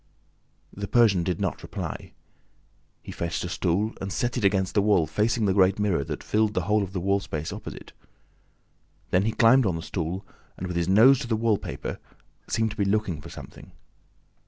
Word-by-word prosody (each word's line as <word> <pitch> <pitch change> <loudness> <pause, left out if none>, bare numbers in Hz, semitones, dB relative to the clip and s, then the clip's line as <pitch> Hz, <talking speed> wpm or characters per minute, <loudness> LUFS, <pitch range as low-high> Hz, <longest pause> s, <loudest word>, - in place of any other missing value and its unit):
The 100 0 -5
Persian 110 -6 +4
did 90 -1 -2
not - - -2
reply. - - -6 0.9
He - - -8
fetched 85 0 -3
a 90 - -4
stool 95 +5 0
and 95 0 -4
set 120 +4 -1
it 120 - -2
against 95 -1 +2
the 105 - +3
wall 100 -5 +3
facing 105 +8 0
the 95 - +2
great 95 0 +4
mirror 100 -8 +1
that - - -6
filled 110 0 +1
the 90 - 0
whole 105 +4 +2
of 95 -2 -4
the 95 - -3
wall 100 +2 +1
space 80 -5 -5
opposite. - - -9 1.2
Then 95 +2 +3
he 110 - +1
climbed 120 +1 +5
on 90 - 0
the 80 - -5
stool 90 +2 -4 0.3
and, 95 - -5
with 90 -1 -4
his 85 +1 0
nose 120 +7 +6
to - - -5
the 115 - +1
wallpaper, 110 -2 -2 0.5
seemed 110 -1 0
to 105 - -9
be 105 - +1
looking 100 -6 0
for - - -10
something. - - -12
100 Hz, 195 wpm, -26 LUFS, 90-110 Hz, 1.2 s, nose